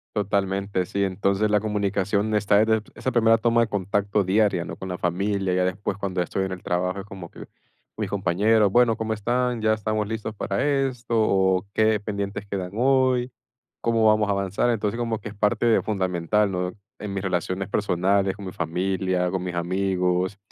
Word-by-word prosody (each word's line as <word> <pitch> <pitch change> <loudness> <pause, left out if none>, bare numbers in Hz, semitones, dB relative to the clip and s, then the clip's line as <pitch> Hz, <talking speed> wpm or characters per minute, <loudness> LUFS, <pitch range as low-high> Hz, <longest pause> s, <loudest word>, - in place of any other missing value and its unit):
Totalmente, 100 -2 0
sí. 100 +2 -1
Entonces, 100 +2 +1
la 105 0 +3
comunicación 105 0 0
está 105 0 +4
desde 110 -1 +1
esa 130 - -3
primera 115 -2 +4
toma 115 +1 +3
de 115 - +2
contacto 100 0 0
diaria, 100 -2 +2
¿no?, 80 -1 -7
con 95 - -8
la 90 - -4
familia. 95 +1 0
Ya 90 0 +2
después 95 +1 -2
cuando 95 -3 -2
estoy 95 +2 -1
en 95 - -5
el 90 - -6
trabajo 90 +2 -1
es 95 - -7
como 95 -4 -9
que, - - -11 0.5
mis - - -2
compañeros, 100 +2 +2
bueno, 120 0 +4
cómo 110 0 -2
están, 120 +3 -1
ya 110 0 +3
estamos 110 0 -1
listos 110 0 -4
para 100 -1 -2
esto, 135 -4 -1
o 95 -3 +2
qué 110 -1 +3
pendientes 100 -1 -4
quedan 95 -2 -4
hoy, 130 0 +2 0.5
cómo 115 -1 +2
vamos 110 -1 +3
a - - +3
avanzar. 100 +4 0
Entonces, 110 0 -1
como 115 -2 -1
que - - -7
es 105 - -12
parte 110 +3 +2
fundamental, 95 0 0
¿no?, 90 0 -2 0.3
en 105 -1 -5
mis 100 0 -3
relaciones 95 +1 -2
personales, 95 0 +1
con 100 -1 -9
mi 95 - -5
familia, 90 +1 -1
con 95 -1 -2
mis 90 -1 -4
amigos, 90 +1 0
100 Hz, 185 wpm, -24 LUFS, 95-110 Hz, 0.5 s, está